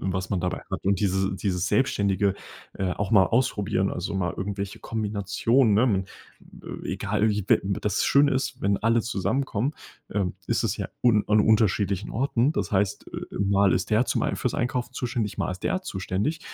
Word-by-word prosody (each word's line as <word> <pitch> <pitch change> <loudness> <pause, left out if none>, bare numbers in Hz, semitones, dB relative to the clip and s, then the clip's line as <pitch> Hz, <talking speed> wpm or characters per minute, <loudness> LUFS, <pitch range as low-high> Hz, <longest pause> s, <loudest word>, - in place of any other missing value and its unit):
was 95 0 -3
man 95 -3 0
dabei 90 0 -2
hat 95 - -5
und 100 -1 +2
diese 95 -1 +1
dieses 90 -1 -1
Selbstständige, 100 -6 +1 0.4
äh, 95 -2 -1
auch 100 +2 -3
mal 100 -3 +7
ausprobieren, 105 -5 0
also 90 - -4
mal 90 -3 -1
irgendwelche 100 0 -4
Kombinationen, 110 +2 +1
ne, 110 - +4
m 95 -6 +1 0.8
egal 105 +2 0
wie 105 -1 -1
web - - +4 0.2
das 105 -2 0
schöne 140 0 +4
ist, 130 -1 -2
wenn 100 +1 +2
alle 115 +1 +2
zusammenkommen 120 +4 -1 0.4
ähm, 100 -3 -1
ist - - +1
es - - 0
ja - - -4 0.2
un 110 -4 +5
an 105 0 +4
unterschiedlichen 105 -2 +2
Orten. 130 +1 +1
Das - - -3
heißt 100 0 0
äh, - - -8
äh, - - -3
mal 100 -1 +3
ist 90 - -1
der 110 +3 +4
zum - - -1
Ei - - 0
fürs - - -2
Einkaufen 125 0 -2
zuständig, 120 -4 -3
mal - - -1
ist 90 - -10
der 185 - 0
zuständig. 100 - -2
100 Hz, 185 wpm, -25 LUFS, 95-115 Hz, 0.8 s, mal